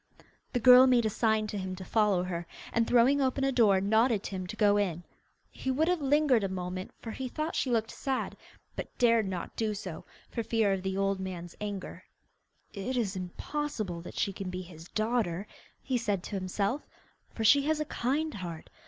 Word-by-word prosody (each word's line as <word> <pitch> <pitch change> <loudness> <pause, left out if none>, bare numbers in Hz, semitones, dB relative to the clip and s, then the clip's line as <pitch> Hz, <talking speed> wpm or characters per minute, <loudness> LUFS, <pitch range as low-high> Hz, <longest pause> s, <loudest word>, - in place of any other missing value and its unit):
The 245 - +1
girl 250 +2 +9
made 245 -3 +4
a 215 - +1
sign 220 0 +2
to 210 -1 -4
him 185 -1 -4
to 185 0 -8
follow 210 -5 +2
her, 170 -2 -4 0.3
and, 230 0 +2
throwing 250 +4 +4
open 270 0 +1
a 270 - +2
door, 215 -7 +4
nodded 220 +2 +2
to - - -5
him 185 -2 -4
to 210 - -6
go 205 -2 +4
in. 175 -4 -1 0.5
He 265 - -5
would 295 +5 +2
have 360 -3 +1
lingered 280 -4 +3
a 195 - 0
moment, 185 0 -4
for 225 - -5
he 260 +3 -4
thought 310 +5 -3
she 265 - 0
looked 225 -2 +1
sad, 265 -2 -2 0.4
but - - -7
dared 230 -3 +4
not 185 -3 -5
do 215 -2 -1
so, 185 -5 -6 0.3
for 230 - -2
fear 220 -3 +2
of 190 - -2
the 190 0 -2
old 195 0 +1
man's 175 -2 -6
anger. 205 -3 -5 0.7
'It 240 +6 -3
is 210 -5 0
impossible 190 - -4
that 175 - -10
she 195 - 0
can 195 -1 -5
be 185 0 -5
his 165 -2 -12
daughter!' 215 -5 -1 0.4
he 255 -2 0
said 205 -6 -1
to - - -5
himself, 195 +7 -1 0.5
'for 225 - -5
she 280 +6 +6
has 310 0 +1
a 305 - -1
kind 295 +4 -1
heart. 170 -4 -7
215 Hz, 205 wpm, -30 LUFS, 190-250 Hz, 0.7 s, girl